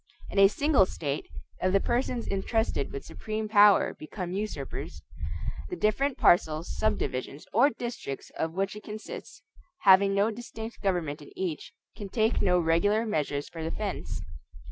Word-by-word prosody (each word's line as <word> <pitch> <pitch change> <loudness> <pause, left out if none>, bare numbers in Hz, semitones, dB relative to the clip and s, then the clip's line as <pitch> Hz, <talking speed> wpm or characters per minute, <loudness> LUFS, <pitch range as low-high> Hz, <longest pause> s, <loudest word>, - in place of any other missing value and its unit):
In - - +1
a 195 - +9
single 270 -2 +3
state, 145 -5 -3 0.3
if 185 - +2
the 195 - +4
persons 240 +2 -1
intrusted 200 - -1
with 140 - -6
supreme 215 0 -4
power 205 -1 +6
become 175 +3 -6
usurpers, 190 -8 -5 0.7
the - - -3
different 260 +6 +1
parcels, 160 -1 +3
subdivisions, 140 -9 -2
or 245 +7 +6
districts 235 - -6
of 160 0 -2
which 195 +3 -1
it 210 - -8
consists, 215 +1 -8 0.4
having 195 0 +6
no 205 +3 +3
distinct 225 0 -8
government 170 -7 -1
in 145 - -12
each, 175 -5 -3 0.2
can 205 -2 -7
take 220 +3 +1
no 180 -2 +4
regular 180 +7 +2
measures 145 -8 -1
for 165 - -8
defense. 160 +1 -4
195 Hz, 145 wpm, -28 LUFS, 165-220 Hz, 0.7 s, a